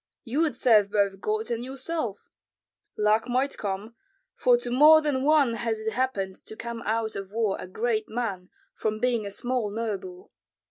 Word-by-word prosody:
You 255 +4 -2
would 310 -7 +1
serve 215 -5 +4
both 200 -2 +1
God 215 +2 -1
and 235 0 -2
yourself; 265 -4 -4 0.6
luck 215 +3 +2
might 260 +3 0
come, 200 +3 -4 0.4
for 245 -1 +4
to 245 0 -5
more 300 +5 +8
than 295 -4 0
one 290 -5 +4
has 230 -1 -2
it 220 0 -2
happened 205 -6 -2
to 220 - -9
come 235 0 -6
out 220 0 -1
of 195 -1 -6
war 220 -2 0
a - - -7
great 220 +3 -1
man, 200 -6 -3 0.2
from 215 0 -2
being 235 -3 0
a - - -4
small 245 +1 -2
noble. 230 - -5
230 Hz, 175 wpm, -26 LUFS, 210-255 Hz, 0.6 s, more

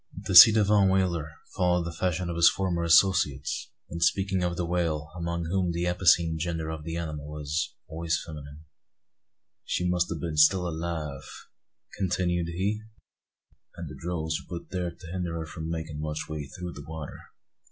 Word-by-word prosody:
(The - - -3
ci 110 +5 +12
devant 105 -2 +4
whaler 85 -5 0 0.2
followed 90 -1 +2
the 85 - -4
fashion 90 +1 -2
of 85 - -3
his 85 0 +7
former 90 -3 -1
associates, 80 -5 +2 0.2
in 85 - -4
speaking 95 +3 +1
of 85 -1 -1
the 90 - -1
whale, 80 -3 -1
among 85 -1 -3
whom 90 +1 0
the 85 +1 -1
epicene 85 -2 +3
gender 80 -1 -3
of 80 -1 -6
the 80 +1 -4
animal 75 -2 -5
is 75 +3 -2
always 80 +1 -2
feminine.) 75 -1 -10 1.0
"She 90 - -1
must 90 0 +1
a' - - -1
been 80 0 -4
still 90 +4 +5
alive," 80 -4 -4 0.8
continued 90 -2 0
he, 95 +5 -2 0.9
"and 85 - -7
the 75 - -9
drogues 80 -2 -2
were 85 - -4
put - - -26
thear 90 -2 -2
to 85 +1 -13
hinder 90 -2 -3
her 80 -1 -4
from 80 0 -7
makin' 80 -2 -4
much 75 0 -4
way 75 -2 -5
through 90 +5 -7
the 70 - -9
water. 80 -2 -7
85 Hz, 175 wpm, -27 LUFS, 80-90 Hz, 1.0 s, ci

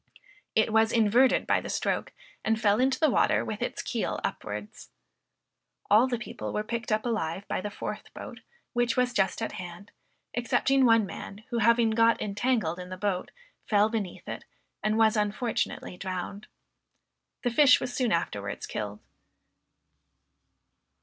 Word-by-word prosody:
It 220 0 +3
was 220 0 +4
inverted 235 +3 +4
by - - +2
the - - -7
stroke, - - -1 0.3
and 220 0 +1
fell 210 -1 +3
into 265 +1 +2
the 315 - +4
water - - +3
with - - -5
its - - -3
keel - - -2
upwards. - - -5 1.0
All 220 +5 +6
the 245 -2 -1
people 240 - -6
were 210 - -1
picked 230 +1 -4
up 215 +2 +1
alive 200 -5 -2
by - - -2
the 210 - -4
fourth - - -6
boat, - - -8 0.3
which 240 0 +1
was 250 -1 +2
just 195 +2 +1
at - - -2
hand, 180 +2 -9 0.4
excepting 260 +3 +2
one 225 -2 +5
man, 200 +2 -8
who 235 - 0
having 230 0 +4
got 230 +1 +4
entangled 205 -4 0
in 180 0 -7
the 185 - -6
boat, 195 -2 -1 0.4
fell 210 0 +4
beneath 210 -6 -4
it, - - -5 0.4
and 215 +1 +1
was 220 -1 +4
unfortunately 210 -2 -1
drowned. 190 +2 -5 1.0
The 245 - +1
fish 265 +2 +6
was 245 - -4
soon 250 -4 0
afterwards 100 -12 -2
killed. 105 0 -5
220 Hz, 155 wpm, -28 LUFS, 200-235 Hz, 1.0 s, All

